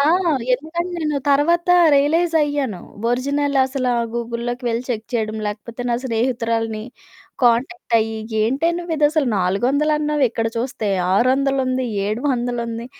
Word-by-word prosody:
ఆ! - - +4 0.5
ఎందుకంటే, 330 +6 -4
నేను 300 -2 0
తర్వాత 335 +5 +2 0.3
రియలైజయ్యాను. 290 - +1 0.3
ఒరిజినల్ 280 +3 0
అసలా 260 -2 -1 0.2
గూగుల్‌లోకి 240 +1 -4
వెళ్ళి 230 +1 -1
చెక్ 225 -3 -3
చేయడం, 220 -2 -1
లేకపోతే 225 +3 -6
నా - - +2
స్నేహితురాలిని 230 -2 -1 0.6
కాంటాక్టయ్యి 235 -2 +1 0.3
ఏంటే 270 +9 +1
నువ్విదసలు 310 -3 +1
నాలుగొందలన్నావు, 285 +10 +1
ఇక్కడ 225 0 -2
చూస్తే 235 -3 -2 0.3
ఆరొందలుంది, 260 +2 +1 0.2
ఏడు 215 +3 -2
వందలుంది. 235 -2 -2
255 Hz, 105 wpm, -20 LUFS, 230-290 Hz, 0.6 s, ఆ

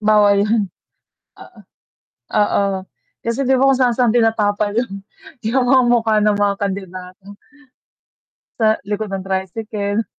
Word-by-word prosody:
Bawal 210 -1 +4
yun 210 -3 0 0.7
oo. - - -15 0.8
Oo 200 -1 +1 0.5
kasi 230 +4 -1
'di 260 0 +2
ba 270 - +4
kung 270 -1 +4
saan-saan 245 -2 +2
tinatapal 210 -3 +1
yun, 200 -5 -3 0.4
yung 245 +3 +1
mga 260 0 +5
mukha 225 -2 +2
ng 210 -1 +2
mga 205 -1 +2
kandidato. 185 -1 -6 1.4
Sa 220 -1 +3
likod 210 +1 -3
ng 195 -1 -4
tricycle. 205 +3 -3
210 Hz, 125 wpm, -18 LUFS, 200-230 Hz, 1.4 s, mga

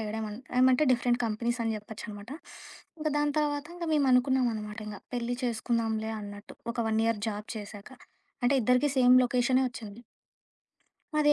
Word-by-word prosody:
అయ్యాడమన్ 215 0 -4 0.2
ఏమంటే 255 +3 +5
different 245 0 +1
companies 235 +2 -1
అని 225 -1 0
చెప్పొచ్చనమాట. 210 +1 -9 0.7
ఇంక 310 0 -1
దాని 295 0 +1
తర్వాత 290 -1 -1
ఇంక 350 - -4
మేము 285 -3 +3
అనుకున్నాంనమాట 245 -5 +1
ఇంగా 210 -2 -7
పెళ్లి 245 0 -2
చేసుకుందాంలే 225 -2 -1
అన్నట్టు 205 0 -9 0.2
ఒక 240 - -13
1 220 0 +2
ఇయర్ 230 -2 0
జాబ్ 210 0 -5
చేశాక. 205 -1 -8 0.5
అంటే 255 +3 +4
ఇద్దరికి 250 +5 +3
సేమ్ 250 0 +7
లొకేషనే 250 +1 +2
ఒచ్చింది. 225 -2 -9 1.2
అదే 295 0 +5
235 Hz, 145 wpm, -29 LUFS, 215-255 Hz, 1.2 s, సేమ్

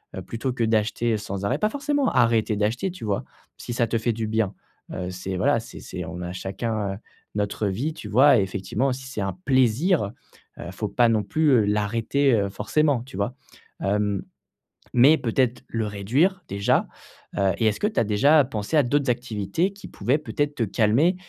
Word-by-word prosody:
heu, 95 - -5
plutôt 115 +7 -3
que 120 - -1
d'acheter 110 +1 +1
sans 100 -1 -5
arrêt? 125 +8 0
Pas 215 - +2
forcément 285 +2 0
arrêter 115 -3 +2
d'acheter, 115 - 0
tu 175 -10 -8
vois? 100 -2 -1 0.3
Si - - -7
ça 120 -1 +1
te 115 - 0
fait 115 +1 0
du 110 0 -3
bien, 110 -2 0 0.4
heu, 90 0 -4
c'est 95 +1 -5
voilà, - - +2
c'est - - -11
c'est - - -6
on 90 - -7
a 90 0 -5
chacun, 100 +2 -3
heu, - - -9 0.4
notre 105 0 -1
vie, 125 +12 -2
tu - - -9
vois? 130 +3 +6
Et - - +3
effectivement 100 +7 -1
si 130 +1 -8
c'est 130 -5 -5
un 95 - -3
plaisir, 130 - +2 0.5
heu, 85 - -6
faut 105 +2 -4
pas 120 +2 +3
non 110 -2 +2
plus, 150 +9 +2
heu, - - 0
l'arrêter, 115 +6 +1
heu, 100 -3 +2
forcément, 135 +6 +1
tu 130 - -12
vois? 100 +5 -1 0.5
Hem, 100 0 0 0.7
mais 135 +6 +6
peut-être 125 +1 0
le 115 -2 -2
réduire 130 - +1
déjà, 100 0 +1 0.5
heu, 95 -1 +2
et 115 - +2
est-ce 105 - +1
que 210 - +2
tu 215 - 0
as - - +2
déjà 140 +9 +4
pensé 115 +2 -3
à 150 - +6
d'autres 140 +1 +1
activités 120 - -1
qui 200 - -11
pouvaient 135 +5 0
peut-être 145 -1 -2
te 115 - -1
calmer 115 - +3
115 Hz, 195 wpm, -24 LUFS, 100-135 Hz, 0.7 s, vois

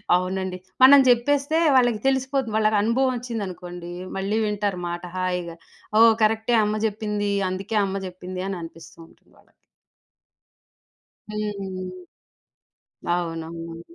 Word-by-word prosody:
అవునండి. 185 0 -2 0.3
మనం 280 +2 +10
జెప్పేస్తే 280 +6 +3 0.2
వాళ్ళకి 245 -4 +3
తెలిసిపోతు 265 -1 0
వాళ్ళకు 215 0 +3
అనుభవమొచ్చిందనుకోండి 220 -8 -2 0.3
మళ్ళీ 195 +3 -1
వింటారు 205 -3 -1
మాట 175 +1 -5
హాయిగా. 180 -2 -2 0.4
"ఓహ్! 225 0 +8
కరెక్టె 220 +2 +2
అమ్మ 210 +1 0
జెప్పింది. 210 -1 -2 0.2
అందుకే 195 +4 -4
అమ్మ 195 0 -3
జెప్పిందని 185 +1 -5
అనిపిస్తూ 165 0 -12
ఉంటుంది - - -26
వాళ్ళకి." - - -28 1.7
హ్మ్. 200 -3 -4 1.3
అవునవును. 165 -1 -5
205 Hz, 100 wpm, -24 LUFS, 185-230 Hz, 1.7 s, మనం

